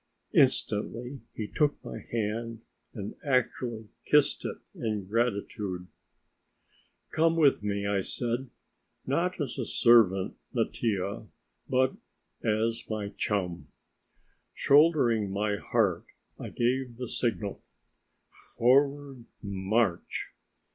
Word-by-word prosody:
Instantly 125 - +2 0.2
he 110 - -4
took 150 +3 +1
my - - -6
hand 115 0 -2 0.3
and 105 -2 -6
actually 125 -4 0 0.2
kissed 150 -1 +3
it - - -3 0.2
in 105 -3 -3
gratitude. 100 -4 -1 1.3
"Come 165 +1 +3
with 150 -8 +4
me," 100 -1 -2
I 100 -1 +1
said; 120 +6 -2 0.6
"not 175 +7 0
as 145 -5 -3
a - - 0
servant, 110 -6 +4 0.2
Mattia, 105 0 -1 0.4
but 130 0 +2 0.5
as 115 +1 +1
my 105 -2 -3
chum." 90 -8 -2 0.9
Shouldering 140 -8 +4
my 100 +1 -1
harp, 100 -6 0 0.3
I - - -6
gave 125 0 -1
the 125 0 -4
signal: 110 -5 -1 1.0
"Forward, 140 0 +2 0.2
march!" 100 0 -1
115 Hz, 100 wpm, -29 LUFS, 100-130 Hz, 1.3 s, with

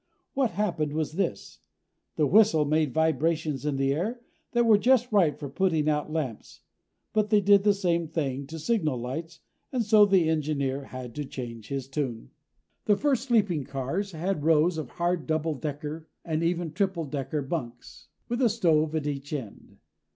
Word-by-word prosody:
What 270 -3 +1
happened 170 -7 -1
was 155 -1 -1
this: 190 +5 -3 0.6
The 155 - +2
whistle 175 -3 +5
made 155 -1 +1
vibrations 160 -1 0
in 145 - 0
the 135 0 +1
air 220 - -3 0.3
that 240 -1 +3
were 215 -3 +6
just 250 0 +3
right 175 -9 +3
for 145 - -6
putting 160 0 0
out 150 -1 +1
the 155 - -8
lamps. 135 -9 -4 0.5
But 215 -1 +1
they 210 -1 +5
did 200 0 +5
the 205 -1 +4
same 170 -4 0
thing 140 -4 -3
to 160 +3 -7
signal 155 - 0
lights, 145 +8 -6 0.3
and 250 -4 0
so 210 0 +6
the 190 -5 +4
engineer 140 -3 -1
had 130 -3 -8
to 150 -1 -4
change 115 -5 -7
his 135 -2 -4
tune. 135 -5 -4 0.5
The 205 -1 +3
first 275 -3 0
sleeping 200 - +2
cars 140 +10 -3
had 170 0 -2
rows 160 +1 +3
of 145 -6 -5
hard 175 -1 -1
double 160 0 0
decker 150 +2 -5 0.2
and 160 -1 -1
even 170 -1 -1
triple 190 -2 -1
decker 140 +1 -3
bunks, 125 -5 -6 0.2
with 240 +2 -2
a 245 - +5
stove 160 -7 +2
at 155 -2 -1
each 140 -1 -4
end. 130 -9 -7
160 Hz, 175 wpm, -27 LUFS, 145-195 Hz, 0.6 s, were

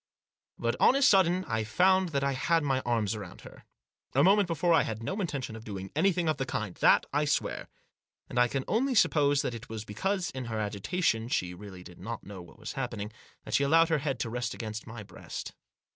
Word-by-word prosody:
But, - - -1
on - - +5
a 275 - +2
sudden, 185 -4 +4
I 110 -3 -1
found 185 - +3
that 140 -3 -1
I 140 - +1
had 165 +5 +1
my 135 -2 +1
arms 115 -4 +1
about 100 -5 -8
her. - - -14 0.5
A - - +5
moment 200 +1 +5
before 170 +1 +1
I 160 - +5
had 110 0 -4
no 195 - -2
intention 140 - -3
of 110 - -9
doing 95 -3 -7
anything 180 -3 +2
of 155 - +1
the 135 - -2
kind 105 -6 -3
— - - -22
that - - +5
I 145 +1 +2
swear. 145 - -1 0.6
And 120 - -2
I 120 - +5
can 130 +2 -3
only 260 +4 +1
suppose 145 -8 +3
that - - -2
it 115 +1 -9
was 110 -1 -6
because, 185 - -2
in 130 -1 -5
her 115 -2 -4
agitation, 110 - -1
she 90 -8 -1
really 95 -1 -10
did 90 -1 -13
not 115 +5 -6
know 100 -2 -9
what 85 - -15
was 110 -1 -7
happening, 120 -6 -4 0.3
that - - -7
she 140 - +3
allowed 165 +4 +4
her 160 -2 +2
head 135 -4 -2
to 115 - -2
rest 120 -1 -3
against 110 -1 -6
my 110 -1 -8
breast. 95 -3 -8
130 Hz, 225 wpm, -29 LUFS, 110-165 Hz, 0.6 s, on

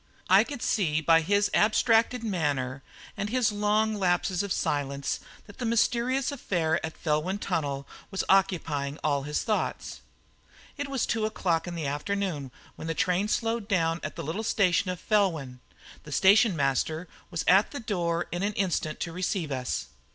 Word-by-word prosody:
I - - +8
could 280 -5 -7
see 160 -8 +1
by 165 +1 +4
his 200 +4 +2
abstracted 225 +3 +3
manner 145 - -1 0.3
and 200 +1 -3
his 245 -2 +2
long 210 +1 +1
lapses 180 -2 +1
of 200 -1 -4
silence 140 -3 -1 0.3
that 205 - -15
the - - -3
mysterious 240 +4 +1
affair 170 - -1
at 160 0 -5
Felwyn 160 +5 0
Tunnel 145 -8 -2 0.2
was 195 - -2
occupying 160 -7 +1
all 145 -2 +1
his 150 +2 -2
thoughts. 65 - -2 0.7
It 285 0 -4
was 270 -3 0
two 220 -1 0
o'clock 175 -6 -1
in 175 - -5
the 165 -3 -3
afternoon 150 0 -2 0.3
when 160 - -6
the 165 - -2
train 180 +5 +1
slowed 225 0 -1
down 165 -5 +1
at - - -5
the - - -5
little 165 +9 -3
station 195 -4 +2
of 180 -1 -3
Felwyn. 165 - 0 0.4
The 150 - -12
station 200 +5 +5
master 155 +4 0 0.2
was 170 - -3
at 190 +4 +5
the 285 - -6
door 175 -6 -1
in 175 - -2
an 205 +2 0
instant 175 -6 -1
to 170 - -2
receive 180 -3 -2
us. 130 -2 -2
180 Hz, 165 wpm, -28 LUFS, 155-210 Hz, 0.7 s, I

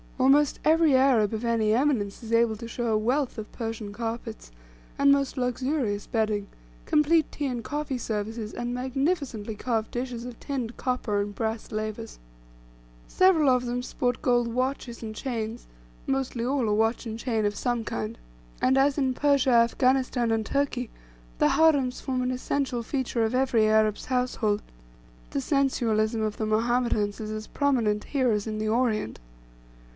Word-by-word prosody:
Almost 275 +2 +4
every 315 -2 +5
Arab 250 -6 +4
of 220 +1 -3
any 225 -2 +2
eminence 235 -6 0
is 225 - -7
able 230 -1 +3
to 230 - -7
show 235 +1 -3
a 220 -1 +2
wealth 250 +5 0
of 215 -1 -7
Persian 225 -3 -5
carpets, 225 - -5 0.5
and 280 0 +5
most 280 0 +1
luxurious 250 -3 -1
bedding, 215 -3 0 0.4
complete 305 +1 +3
tea 290 - -3
and 245 -3 -3
coffee 290 +1 -3
services, 220 0 -4
and 240 0 -3
magnificently 260 - -2
carved 225 0 -2
dishes 245 -1 -4
of 245 -2 -8
tinned 250 -5 -4
copper 245 -5 -1
and 205 0 -5
brass 220 +1 -3
lavers. 215 +1 -4 0.9
Several 360 -6 +4
of 250 -1 +2
them 245 +1 -2
sport 250 -1 -2
gold 240 -1 +3
watches 250 0 -3
and 215 -1 -5
chains, 230 -2 -4 0.4
mostly 265 -3 -1
all 260 -2 0
a 210 - +2
watch 225 +3 +1
and 225 0 -5
chain 225 -4 0
of 205 0 0
some 240 0 -1
kind. 110 - -4 0.4
And, 260 +1 +3
as 275 +1 +3
in 265 -3 +1
Persia, 280 -1 +2
Afghanistan, 245 0 +2
and 220 -1 0
Turkey, 255 -2 -1 0.5
the - - +3
harems 285 -6 +3
form 255 -2 -1
an 250 - 0
essential 255 -1 -1
feature 245 -1 -1
of 220 +3 0
every 250 -4 +3
Arab's 215 -1 +2
household; 250 -5 0 0.7
the - - -2
sensualism 225 - +1
of 215 -1 -2
the 220 - -2
Mohammedans 220 -2 +1
is 215 -1 -5
as 215 0 -5
prominent 235 -8 +1
here 260 -4 +1
as 210 0 -1
in 215 -1 -3
the 215 0 -1
Orient. 220 - 0
240 Hz, 160 wpm, -26 LUFS, 220-265 Hz, 0.9 s, every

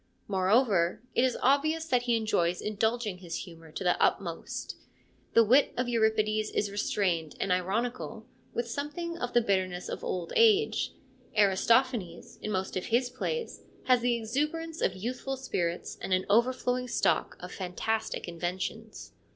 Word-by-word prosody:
Moreover, 195 -1 +2
it - - +3
is 260 -1 +1
obvious 310 +5 +3
that 250 -5 +2
he 240 -1 +1
enjoys 180 -6 +1
indulging 215 -1 -1
his 175 -2 -5
humour 165 -3 -13
to - - -4
the 180 -1 +2
utmost. - - -1 0.6
The 230 - +8
wit 255 +6 +4
of 250 0 0
Euripides 220 -2 +1
is 205 - -1
restrained 180 -6 0
and 195 - -1
ironical, 220 +5 -1 0.3
with 235 0 -2
something 295 +7 -4
of 245 - -3
the 240 - +5
bitterness 185 -4 -1
of - - -5
old 175 -2 -3
age; 440 -2 +4 0.4
Aristophanes 205 -1 +2
in - - -4
most 190 -2 -2
of 185 - -2
his 245 +2 +1
plays 470 - -3 0.2
has 255 -1 +4
the 240 0 +2
exuberance 300 +8 -2
of 185 - +1
youthful 250 +6 -4
spirits 175 -10 -3
and - - -5
an 185 - -1
overflowing 250 +2 +2
stock - - +1
of - - -8
fantastic 200 +4 -3
inventions. 180 +6 -5
220 Hz, 150 wpm, -29 LUFS, 185-250 Hz, 0.6 s, The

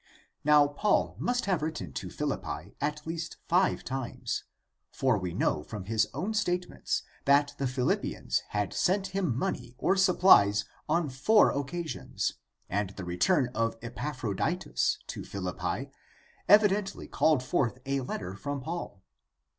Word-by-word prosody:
Now, 150 0 +6
Paul 145 +9 +1
must 245 0 0
have 185 -5 +1
written 150 - -4
to - - -4
Philii)pi - - -4
at 150 +1 -2
least 165 0 -4
five 180 +2 +2
times; 130 -2 -4 0.5
for 130 -3 +2
we 90 -2 -3
know 75 - 0
from 100 +4 -7
his 110 +1 +2
own 180 - -3
statements 180 -4 -1 0.2
that 140 +1 +4
the 135 - +1
Philippians 125 0 0
had 105 -1 -1
sent 190 +1 +1
him 185 -11 -1
money 125 -2 -3
or 190 - +2
supplies 175 - +5 0.2
on 165 0 +2
four 145 - +4
occasions, 155 +4 -3 0.3
and 100 0 -1
the 95 - -6
return 125 - +2
of 115 0 0
Epaphroditus 130 - -1
to - - -6
Philippi - - -4 0.6
evidently 205 -1 +4
called 155 -5 +2
forth 130 -4 0
a 135 0 0
letter 95 -7 -4
from 140 +9 -4
Paul. 145 - -6
140 Hz, 135 wpm, -29 LUFS, 115-175 Hz, 0.6 s, Now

